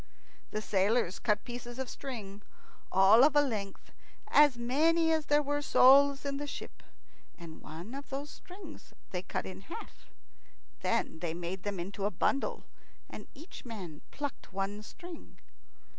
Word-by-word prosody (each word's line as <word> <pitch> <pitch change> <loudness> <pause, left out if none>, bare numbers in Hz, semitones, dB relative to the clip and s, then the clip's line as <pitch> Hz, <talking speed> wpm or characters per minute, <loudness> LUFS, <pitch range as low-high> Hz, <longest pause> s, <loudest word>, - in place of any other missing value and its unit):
The 215 0 -3
sailors 200 -1 +1
cut 210 -2 +1
pieces 240 0 -7
of 265 -1 -3
string, 210 -8 -7 0.5
all 200 +6 +7
of 295 0 +5
a 290 - +7
length, 210 -7 -4 0.4
as 290 -4 +6
many 320 +7 +3
as 315 -2 +1
there 295 0 +4
were 290 +1 -1
souls 280 +1 +6
in 280 -1 -1
the 290 +1 -4
ship, - - -8 0.6
and 165 -2 -10
one 170 +9 -8
of 280 +1 -7
those 280 +2 -5
strings 360 -4 -12 0.2
they 180 - -2
cut 185 - -4
in 95 0 -8
half. - - -10 0.7
Then - - 0
they 165 -1 -3
made 175 +2 -4
them 200 -1 -3
into 195 +3 -4
a - - +3
bundle, 210 +8 0 0.5
and - - -9
each 315 +6 -11
man 190 - -8
plucked 285 -6 -6
one 195 +2 -3
string. 345 - -11
240 Hz, 155 wpm, -31 LUFS, 195-285 Hz, 0.7 s, all